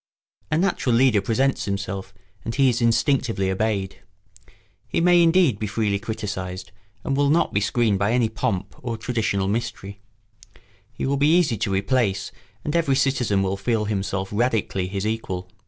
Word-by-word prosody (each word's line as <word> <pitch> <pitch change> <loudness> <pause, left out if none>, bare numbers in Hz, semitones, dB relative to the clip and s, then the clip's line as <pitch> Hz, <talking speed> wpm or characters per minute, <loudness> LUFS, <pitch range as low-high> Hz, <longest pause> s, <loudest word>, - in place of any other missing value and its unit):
A 155 - +1
natural 170 -9 +1
leader 120 -4 +4
presents 130 +6 0
himself 100 -1 -4 0.3
and 115 - -4
he 135 -2 +4
is 120 0 -1
instinctively 115 -4 +1
obeyed. 100 -1 -2 0.9
He - - -1
may 175 +1 +5
indeed 165 - +4
be 105 - -2
freely 105 -1 0
criticised 95 -4 -5 0.3
and 135 - -1
will 140 0 +2
not 165 +3 +2
be 100 - +1
screened 105 -1 +1
by 100 +3 +1
any 120 -2 +3
pomp 105 -4 -3
or 120 -2 -4
traditional 110 -4 -1
mystery; 100 -1 -4 0.9
he - - -4
will 140 +1 0
be 150 +5 +4
easy 155 -10 +2
to 105 - -1
replace 100 -1 0 0.3
and 150 - -2
every 160 -5 +2
citizen 125 -7 +1
will 95 0 -1
feel 110 +1 0
himself 100 -2 -2
radically 105 -4 0
his 100 +1 -3
equal. 95 -5 -3
110 Hz, 160 wpm, -23 LUFS, 100-130 Hz, 0.9 s, may